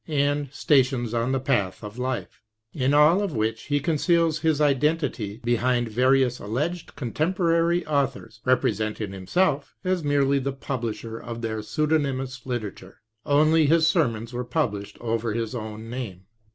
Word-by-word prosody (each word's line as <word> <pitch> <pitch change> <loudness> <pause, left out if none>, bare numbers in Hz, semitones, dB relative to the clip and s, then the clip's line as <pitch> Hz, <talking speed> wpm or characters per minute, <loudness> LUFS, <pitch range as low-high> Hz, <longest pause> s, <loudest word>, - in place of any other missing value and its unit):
and 145 -2 0
" - - -30
Stations 130 -5 +2
on 120 +2 0
the 135 - +1
Path 100 -9 -1
of 105 +3 -8
Life," 130 0 -4 0.3
in 135 -2 +1
all 150 +6 +5
of 195 -9 -2
which 110 +1 -1
he 145 0 +1
conceals 165 +1 +2
his 155 -2 +1
identity 140 -7 +1
behind 120 0 +1
various 125 +2 +2
alleged 150 - -3
contemporary 165 +5 +1
au 140 -3 +2
thors, 135 -1 -13
representing 110 -4 0
himself 140 - 0
as 185 -2 0
merely 140 -1 +2
the 135 0 -2
pub 135 -2 -4
lisher 115 0 -5
of 115 0 -7
their 110 -1 -2
pseudonymous 135 +1 -1
literature. 105 -6 -5 0.3
Only 155 +2 +4
his 160 +2 +4
sermons 120 - +1
were 125 +1 -2
published 110 -8 -2
over 115 -1 -1
his 115 -1 -2
own 110 -1 -6
name. 115 -7 -6
130 Hz, 150 wpm, -25 LUFS, 115-150 Hz, 0.3 s, all